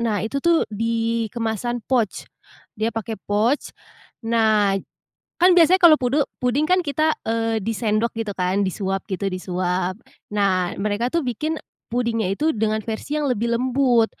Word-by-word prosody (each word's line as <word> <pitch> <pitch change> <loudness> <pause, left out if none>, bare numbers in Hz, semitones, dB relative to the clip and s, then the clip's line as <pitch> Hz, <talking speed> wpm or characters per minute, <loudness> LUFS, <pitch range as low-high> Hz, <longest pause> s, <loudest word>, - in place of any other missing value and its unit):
nah 225 -3 0
itu 275 +5 -2
tuh 340 -1 +3
di 230 +1 -1
kemasan 235 +1 -2
pouch, 235 -6 0 0.5
dia 220 +2 0
pakai 225 0 -4
pouch. 220 +7 +1 0.6
Nah, 215 -3 +3 0.7
kan 365 +1 +7
biasanya 355 +3 +6
kalau 330 -3 +8
pude 260 +4 +1 0.2
puding 255 +5 +1
kan 365 0 +3
kita, 310 +2 +1
eee, 225 0 0
disendok 225 +1 0
gitu 220 -2 -2
kan 185 +2 +1
disuap 190 0 -2
gitu 195 +1 -2
disuap. 185 0 -2 0.4
Nah 185 -3 +1
mereka 210 +4 0
tuh 335 -2 +1
bikin 305 +7 -2 0.3
pudingnya 230 -4 0
itu 310 +7 0
dengan 215 0 0
versi 260 +7 -3
yang 295 - -1
lebih 235 0 0
lembut. 250 -2 +3
225 Hz, 150 wpm, -22 LUFS, 205-255 Hz, 0.7 s, kalau